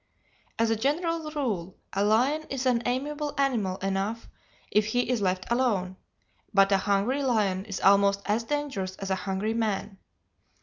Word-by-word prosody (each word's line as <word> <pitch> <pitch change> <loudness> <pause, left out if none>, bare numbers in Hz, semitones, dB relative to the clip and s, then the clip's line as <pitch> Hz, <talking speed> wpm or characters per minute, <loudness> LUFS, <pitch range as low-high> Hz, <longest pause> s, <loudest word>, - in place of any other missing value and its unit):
As 230 0 +2
a - - +3
general 315 +6 -1
rule 215 - -3 0.2
a 195 - +1
lion 255 +9 +2
is 270 -1 -3
an 245 -2 +3
amiable 290 +4 -2
animal 230 -9 +1
enough 195 +4 -2 0.4
if 210 0 +3
he 245 +3 0
is 250 -4 0
left 185 -1 0
alone, 210 -7 +1 0.6
but 195 0 +4
a 195 - +5
hungry 205 +8 +1
lion 205 -7 +1
is 200 -3 -5
almost 200 0 +4
as 215 +3 +1
dangerous 265 -9 -3
as 195 0 -5
a - - +3
hungry 200 +3 -1
man. 210 -3 -2
220 Hz, 160 wpm, -27 LUFS, 195-260 Hz, 0.6 s, a